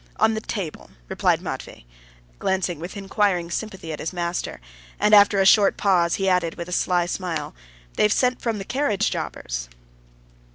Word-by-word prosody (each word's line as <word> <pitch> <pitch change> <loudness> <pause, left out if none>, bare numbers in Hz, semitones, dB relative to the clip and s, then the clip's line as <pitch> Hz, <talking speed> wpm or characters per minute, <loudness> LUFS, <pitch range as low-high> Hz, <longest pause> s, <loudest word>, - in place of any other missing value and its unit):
"On 220 - +3
the 220 - -3
table," 195 -8 -5 0.2
replied - - +1
Matvey, - - -7 0.5
glancing 185 -4 -1
with 175 +5 -7
inquiring 195 -3 0
sympathy 190 -6 -5
at 150 - -6
his 160 - -3
master; 175 -1 -3 0.4
and, 210 - +3
after 205 -1 +7
a 195 - +4
short 200 +1 +5
pause, 175 -4 +2
he 195 - -1
added 180 -3 +1
with 170 - -6
a - - -8
sly 180 -1 +1
smile, 175 -4 -4 0.4
"They've 210 - +4
sent 250 +3 +1
from 230 -3 -1
the 195 - -6
carriage 260 -6 0
jobbers." - - -4
190 Hz, 165 wpm, -23 LUFS, 170-205 Hz, 0.5 s, after